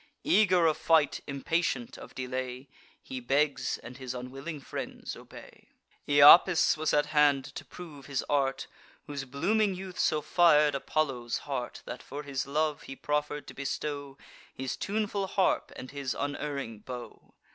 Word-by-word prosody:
Eager 200 - +4
of 155 -2 +3
fight, 160 -4 +3
impatient 140 -3 -1
of - - -12
delay, 130 +1 -4 0.4
He 130 - -6
begs; 140 +4 +1
and 125 - -9
his 130 -2 -6
unwilling 135 +5 -6
friends 135 - -6
obey. - - -14 0.4
Iapis 145 +5 +8
was 155 0 0
at 145 0 +3
hand 145 -3 +4
to - - -7
prove 155 -6 -11
his 140 -3 -2
art, 135 -2 0 0.4
Whose 140 -3 -5
blooming 195 +10 +1
youth 185 0 -8
so 155 - +2
fir'd 150 -3 +5
Apollo's 135 -4 -1
heart, 130 -4 -4
That, - - -7
for 145 +2 -7
his 135 -2 -3
love, 150 +1 0
he 135 - -6
proffer'd 150 +1 -2
to - - -10
bestow 140 0 -4 0.4
His 130 -1 -3
tuneful 205 -1 -2
harp 190 0 +1
and 130 - -8
his 140 -2 -3
unerring 140 -5 -4
bow. 125 +1 -10
145 Hz, 145 wpm, -29 LUFS, 135-155 Hz, 0.4 s, Iapis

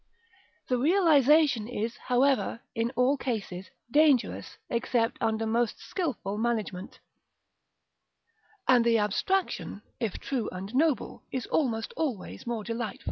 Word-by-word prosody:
The 250 -1 +1
realisation 300 - +4
is, 235 -1 -3
however, 260 -1 +1
in 230 0 0
all 255 +3 +3
cases, 200 -8 -4 0.2
dangerous 290 -4 +2
except 235 -1 0
under 225 0 0
most 230 0 0
skilful 250 - -3
management, 220 -5 -2 1.7
and 250 -2 +6
the 230 -1 +4
abstraction, 210 - -1 0.2
if 225 -5 -2
true 250 -6 -3
and 190 +4 -7
noble, 285 -3 +1
is 255 -3 -3
almost 230 -7 -1
always 255 -8 -4
more 235 -3 -2
delightful. 230 -1 -4
235 Hz, 115 wpm, -28 LUFS, 220-270 Hz, 1.7 s, and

